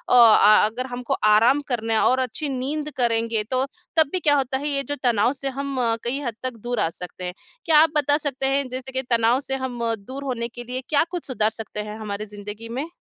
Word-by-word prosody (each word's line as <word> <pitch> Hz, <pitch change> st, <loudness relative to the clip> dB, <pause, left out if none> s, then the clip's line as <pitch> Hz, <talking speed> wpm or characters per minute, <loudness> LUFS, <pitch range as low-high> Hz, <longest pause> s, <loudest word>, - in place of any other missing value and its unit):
अ, 215 Hz, -3 st, +7 dB
अगर 235 Hz, +4 st, -3 dB
हमको 245 Hz, -1 st, -3 dB
आराम 225 Hz, +7 st, +5 dB
करना 225 Hz, -3 st, -1 dB
है 220 Hz, -, +3 dB
और 255 Hz, -, +2 dB
अच्छी 260 Hz, +4 st, -2 dB
नींद 280 Hz, +3 st, -3 dB
करेंगे 230 Hz, -2 st, +1 dB
तो 260 Hz, +1 st, +1 dB, 0.3 s
तब 315 Hz, -3 st, +5 dB
भी 370 Hz, -, -1 dB
क्या 295 Hz, -4 st, +3 dB
होता 265 Hz, -1 st, 0 dB
है 285 Hz, +2 st, -4 dB
ये 275 Hz, -1 st, 0 dB
जो 290 Hz, +1 st, -3 dB
तनाव 240 Hz, -1 st, +3 dB
से 275 Hz, 0 st, -4 dB
हम 280 Hz, -1 st, -3 dB, 0.3 s
कई 245 Hz, +4 st, -1 dB
हद 240 Hz, -5 st, -4 dB
तक 255 Hz, -1 st, -2 dB
दूर 245 Hz, 0 st, -2 dB
आ -, -, +2 dB
सकते। 180 Hz, +1 st, -7 dB, 0.3 s
क्या 320 Hz, -3 st, +6 dB
आप 320 Hz, -, +5 dB
बता 290 Hz, 0 st, +3 dB
सकते 280 Hz, -3 st, -3 dB
हैं 275 Hz, 0 st, +1 dB
जैसे 255 Hz, +1 st, -6 dB
कि 260 Hz, 0 st, -1 dB
तनाव 235 Hz, +1 st, +3 dB
से 270 Hz, -1 st, -2 dB
हम 260 Hz, -2 st, -4 dB, 0.3 s
दूर 270 Hz, +4 st, -7 dB
होने 245 Hz, -4 st, -2 dB
के 240 Hz, +1 st, -9 dB
लिए 250 Hz, +2 st, -5 dB
क्या 295 Hz, -1 st, +4 dB
कुछ 355 Hz, -2 st, -4 dB
सुधार 220 Hz, -5 st, +1 dB
सकते 220 Hz, -1 st, -7 dB
हैं 210 Hz, -, -7 dB
हमारी 210 Hz, -1 st, -4 dB
ज़िंदगी 210 Hz, +2 st, -9 dB
में? 260 Hz, +7 st, -3 dB
255 Hz, 225 wpm, -23 LUFS, 225-275 Hz, 0.3 s, अ